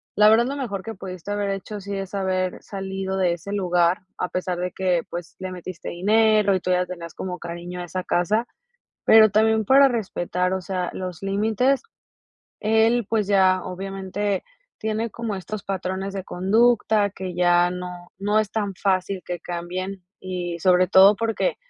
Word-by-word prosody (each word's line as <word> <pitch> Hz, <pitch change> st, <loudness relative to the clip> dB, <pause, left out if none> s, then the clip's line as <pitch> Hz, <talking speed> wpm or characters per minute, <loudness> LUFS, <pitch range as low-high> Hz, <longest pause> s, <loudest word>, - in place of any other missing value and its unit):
la 210 Hz, +1 st, +6 dB
verdad 225 Hz, +2 st, +5 dB
lo 275 Hz, -, -3 dB
mejor 210 Hz, -9 st, -4 dB
que 225 Hz, -, -6 dB
pudiste 185 Hz, 0 st, -7 dB
haber 205 Hz, -1 st, -1 dB
hecho, 195 Hz, +1 st, -5 dB
sí 200 Hz, 0 st, -5 dB
es 195 Hz, 0 st, -6 dB
haber 185 Hz, -2 st, -1 dB
salido 190 Hz, -1 st, -4 dB
de 180 Hz, -2 st, +2 dB
ese 175 Hz, +4 st, -7 dB
lugar 180 Hz, -1 st, +2 dB, 0.2 s
a 180 Hz, -, -1 dB
pesar 180 Hz, -1 st, -2 dB
de 180 Hz, 0 st, -2 dB
que, 180 Hz, -3 st, +1 dB
pues, 175 Hz, -1 st, -7 dB
le 185 Hz, -1 st, -5 dB
metiste 180 Hz, -1 st, -7 dB
dinero 210 Hz, +2 st, +3 dB
y 185 Hz, -, +1 dB
tú 185 Hz, -, -4 dB
ya 180 Hz, 0 st, +2 dB
tenías 170 Hz, -2 st, -8 dB
como 180 Hz, -1 st, -5 dB
cariño 175 Hz, +1 st, -6 dB
a -, -, -5 dB
esa 185 Hz, +1 st, -4 dB
casa, 210 Hz, +8 st, +1 dB, 0.6 s
pero 220 Hz, -2 st, +7 dB
también 220 Hz, 0 st, +3 dB
para 275 Hz, +4 st, +6 dB
respetar, 180 Hz, -5 st, -1 dB
o 190 Hz, -, -2 dB
sea 180 Hz, -1 st, -3 dB
los 185 Hz, -2 st, -6 dB
límites, 220 Hz, -, +1 dB, 0.8 s
él, 225 Hz, +1 st, +2 dB
pues, 220 Hz, -2 st, +1 dB
ya 190 Hz, -2 st, +3 dB
obviamente 195 Hz, +1 st, -3 dB, 0.3 s
tiene 220 Hz, +1 st, -2 dB
como 225 Hz, -1 st, -4 dB
estos 195 Hz, +2 st, -6 dB
patrones 190 Hz, 0 st, -3 dB
de 195 Hz, -2 st, -4 dB
conducta, 215 Hz, +2 st, +2 dB
que 190 Hz, -2 st, -6 dB
ya 175 Hz, 0 st, +4 dB
no 180 Hz, -1 st, -7 dB
no 205 Hz, +2 st, +1 dB
es 215 Hz, -2 st, -1 dB
tan 205 Hz, -3 st, -2 dB
fácil 190 Hz, -1 st, 0 dB
que 175 Hz, -1 st, -4 dB
cambien 180 Hz, +2 st, -5 dB, 0.2 s
y 180 Hz, -2 st, -4 dB
sobre 180 Hz, +1 st, +4 dB
todo 195 Hz, +2 st, +7 dB
porque 230 Hz, -, 0 dB
190 Hz, 175 wpm, -23 LUFS, 180-210 Hz, 0.8 s, pero